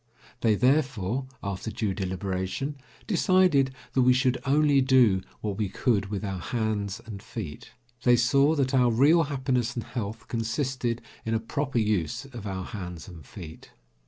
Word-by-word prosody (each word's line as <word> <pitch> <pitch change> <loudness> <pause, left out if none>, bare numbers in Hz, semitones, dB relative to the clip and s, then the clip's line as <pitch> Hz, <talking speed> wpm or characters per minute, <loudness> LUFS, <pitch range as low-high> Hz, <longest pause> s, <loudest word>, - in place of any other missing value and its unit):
They, 110 -3 +3
therefore, 130 -2 +1 0.2
after 100 +2 -3
due 105 -3 -2
deliberation, 95 +8 -3 0.3
decided 185 - +3 0.2
that 130 - +3
we 125 0 +6
should 130 0 +2
only 145 0 +4
do 125 -8 +4 0.2
what 105 -2 -3
we 105 -3 0
could 105 -1 +1
with 100 0 -4
our 95 -2 -3
hands 110 -1 -2
and 105 -4 -8
feet. - - -8 0.3
They 120 0 +5
saw 140 +6 +4
that 135 -2 0
our 125 -2 +4
real 145 +8 +5
happiness 130 -4 -1
and 120 - -3
health 110 -1 -5
consisted 120 0 -2 0.2
in 115 0 -1
a - - +1
proper 135 +3 -2
use 105 - 0
of 120 -6 -8
our 95 -1 -4
hands 90 -4 -7
and 85 -5 -11
feet. 80 +4 -11
115 Hz, 160 wpm, -27 LUFS, 100-135 Hz, 0.3 s, we